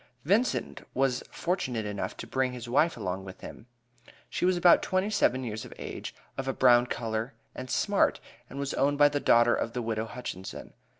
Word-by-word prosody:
Vincent 210 Hz, -, +1 dB
was 130 Hz, -1 st, +1 dB
fortunate 130 Hz, -, -2 dB
enough 105 Hz, -1 st, -4 dB
to -, -, -6 dB
bring 130 Hz, -1 st, -1 dB
his 120 Hz, -1 st, -7 dB
wife 150 Hz, +7 st, +2 dB
along 95 Hz, 0 st, -3 dB
with 95 Hz, -1 st, -10 dB
him. 115 Hz, -, -10 dB, 0.6 s
She -, -, 0 dB
was 185 Hz, 0 st, +3 dB
about 175 Hz, 0 st, +6 dB
twenty 190 Hz, +2 st, 0 dB
seven 130 Hz, -, +2 dB
years 110 Hz, -2 st, -4 dB
of -, -, -11 dB
age, -, -, -7 dB, 0.2 s
of 135 Hz, -, -3 dB
a 135 Hz, -, 0 dB
brown 125 Hz, -1 st, +5 dB
color, 115 Hz, +2 st, -3 dB, 0.2 s
and 130 Hz, 0 st, -7 dB
smart, -, -, +2 dB, 0.3 s
and 135 Hz, -, -9 dB
was 140 Hz, 0 st, -2 dB
owned 145 Hz, +1 st, +1 dB
by 145 Hz, 0 st, +6 dB
the 145 Hz, -, -1 dB
daughter 120 Hz, -2 st, +5 dB
of 115 Hz, -, -2 dB
the 125 Hz, -, -2 dB
widow 110 Hz, -1 st, -2 dB
Hutchinson. 115 Hz, -6 st, -7 dB
125 Hz, 190 wpm, -29 LUFS, 115-145 Hz, 0.6 s, about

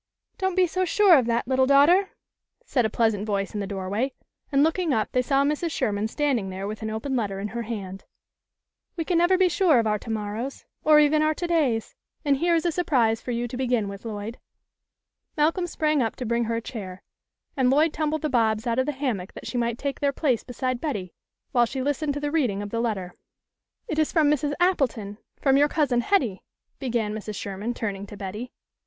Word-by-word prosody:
" -, -, -52 dB
Don't 380 Hz, -1 st, 0 dB
be 370 Hz, -1 st, +5 dB
so 370 Hz, +2 st, -1 dB
sure 370 Hz, 0 st, +5 dB
of 255 Hz, -5 st, +3 dB
that, 235 Hz, 0 st, 0 dB
little 260 Hz, 0 st, +3 dB
daughter," 330 Hz, +8 st, +5 dB, 0.6 s
said 245 Hz, -, +1 dB
a -, -, -7 dB
pleasant 220 Hz, -2 st, +1 dB
voice 200 Hz, -1 st, -2 dB
in 210 Hz, -, -3 dB
the 200 Hz, -, -3 dB
doorway, 200 Hz, +7 st, -2 dB, 0.4 s
and 275 Hz, 0 st, +4 dB
looking 325 Hz, -2 st, +1 dB
up, 215 Hz, -1 st, -1 dB
they 250 Hz, -, +2 dB
saw 275 Hz, +2 st, +2 dB
Mrs. 300 Hz, +4 st, 0 dB
Sherman 215 Hz, -8 st, -1 dB
standing 250 Hz, -6 st, 0 dB
there 190 Hz, +1 st, -5 dB
with 215 Hz, +2 st, -5 dB
an 220 Hz, -, -3 dB
open 220 Hz, +5 st, -3 dB
letter 200 Hz, -5 st, -1 dB
in 205 Hz, +1 st, -3 dB
her 235 Hz, +2 st, -4 dB
hand. 200 Hz, -4 st, -6 dB, 0.9 s
"We 330 Hz, -2 st, -3 dB
can 345 Hz, -1 st, +2 dB
never 350 Hz, +2 st, +4 dB
be 375 Hz, 0 st, +4 dB
sure 350 Hz, -5 st, +3 dB
of 230 Hz, -, +2 dB
our 210 Hz, -1 st, +1 dB
28 225 Hz, -, -7 dB
THE 220 Hz, -, -1 dB
LITTLE 210 Hz, -, -4 dB
COLONEL'S 215 Hz, -, -4 dB
HOLIDAYS. 270 Hz, +2 st, -6 dB
to -, -, -44 dB
morrows, 305 Hz, -, +8 dB
or -, -, +8 dB
even 300 Hz, +1 st, +4 dB
our 310 Hz, 0 st, +3 dB
to 350 Hz, -, -3 dB
days, 290 Hz, -10 st, 0 dB, 0.3 s
and 280 Hz, -1 st, +3 dB
here 340 Hz, +3 st, +2 dB
is 330 Hz, -, 0 dB
a 345 Hz, -, +2 dB
surprise 250 Hz, -10 st, +1 dB
for -, -, -8 dB
you 240 Hz, 0 st, -1 dB
to 240 Hz, -, -7 dB
begin 245 Hz, -4 st, 0 dB
with, 200 Hz, 0 st, -8 dB
Lloyd." 220 Hz, +1 st, -6 dB, 1.0 s
Malcolm 330 Hz, +4 st, +2 dB
sprang 305 Hz, -3 st, +1 dB
up 225 Hz, -2 st, -1 dB
to 250 Hz, -, -5 dB
bring 235 Hz, +1 st, 0 dB
her 230 Hz, +1 st, -1 dB
a 230 Hz, -, -2 dB
chair, 195 Hz, -6 st, -7 dB, 0.5 s
and 260 Hz, -3 st, +3 dB
Lloyd 300 Hz, +4 st, +3 dB
tumbled 310 Hz, 0 st, -1 dB
the -, -, +2 dB
Bobs 225 Hz, -4 st, +1 dB
out 235 Hz, +1 st, 0 dB
of 260 Hz, -, +1 dB
the 295 Hz, -, 0 dB
hammock 245 Hz, -9 st, -3 dB
that -, -, -10 dB
she 245 Hz, -, -2 dB
might 235 Hz, -1 st, -1 dB
take 280 Hz, +1 st, -3 dB
their 285 Hz, -1 st, +2 dB
place 265 Hz, -5 st, 0 dB
beside 255 Hz, 0 st, -3 dB
Betty, 205 Hz, -, -3 dB, 0.4 s
while 240 Hz, -1 st, +3 dB
she 265 Hz, -, -5 dB
listened 290 Hz, +1 st, -1 dB
to -, -, -2 dB
the 290 Hz, 0 st, -2 dB
reading 240 Hz, -11 st, 0 dB
of 205 Hz, -, -7 dB
the 230 Hz, -, -1 dB
letter. 195 Hz, -6 st, -2 dB, 0.4 s
" -, -, -57 dB
It 315 Hz, -, -2 dB
is 310 Hz, -, +2 dB
from 305 Hz, -3 st, +3 dB
Mrs. 295 Hz, 0 st, 0 dB
Appleton 245 Hz, -, 0 dB, 0.2 s
from 270 Hz, -1 st, +3 dB
your 290 Hz, +1 st, +4 dB
Cousin 270 Hz, -7 st, +1 dB
Hetty," 240 Hz, -, +1 dB, 0.4 s
began 235 Hz, -5 st, -1 dB
Mrs. 215 Hz, -1 st, -5 dB
Sherman, 200 Hz, +5 st, -4 dB
turning 200 Hz, -3 st, -4 dB
to 205 Hz, -, -10 dB
Betty. 210 Hz, +6 st, -6 dB
250 Hz, 235 wpm, -25 LUFS, 215-300 Hz, 1.0 s, morrows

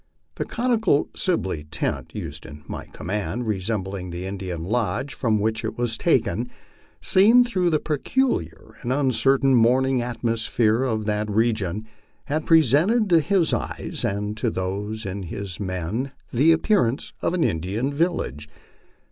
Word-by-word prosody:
The -, -, -3 dB
conical 225 Hz, -, +1 dB
SiWey 95 Hz, -, -1 dB
tent 80 Hz, 0 st, -3 dB
used 80 Hz, +3 st, -6 dB
in 75 Hz, -1 st, -11 dB
my -, -, -6 dB
command, 105 Hz, +5 st, -4 dB
resembling 95 Hz, -2 st, -2 dB
the 85 Hz, +1 st, -5 dB
Indian 95 Hz, -4 st, -5 dB
lodge 115 Hz, +6 st, -1 dB
from 110 Hz, -4 st, +1 dB
which 110 Hz, +1 st, -1 dB
it -, -, -4 dB
was 120 Hz, -2 st, 0 dB
taken, 120 Hz, -6 st, +1 dB, 0.5 s
seen 225 Hz, +6 st, +6 dB
through 185 Hz, -7 st, 0 dB
the 155 Hz, -, +3 dB
peculiar 150 Hz, -, -1 dB
and 120 Hz, -, -3 dB
uncertain 135 Hz, 0 st, +3 dB
morning 130 Hz, +2 st, +3 dB
atmosphere 115 Hz, -1 st, 0 dB
of 110 Hz, -5 st, -1 dB
that 105 Hz, 0 st, -1 dB
region, 110 Hz, -2 st, 0 dB, 0.4 s
had 155 Hz, +2 st, -2 dB
presented 165 Hz, -, +4 dB
to 170 Hz, -, +7 dB
his 175 Hz, +2 st, +2 dB
eyes -, -, -3 dB
and 105 Hz, +1 st, -2 dB
to 115 Hz, +1 st, 0 dB
those 105 Hz, +3 st, -3 dB
of 95 Hz, 0 st, -4 dB
his 95 Hz, +1 st, -6 dB
men 100 Hz, +8 st, -3 dB, 0.2 s
the 145 Hz, +7 st, +5 dB
appearance 160 Hz, -, +1 dB
of 180 Hz, -, 0 dB
an 175 Hz, -, +1 dB
Indian 100 Hz, -, -1 dB
village. 140 Hz, -, -1 dB
115 Hz, 140 wpm, -24 LUFS, 100-145 Hz, 0.5 s, to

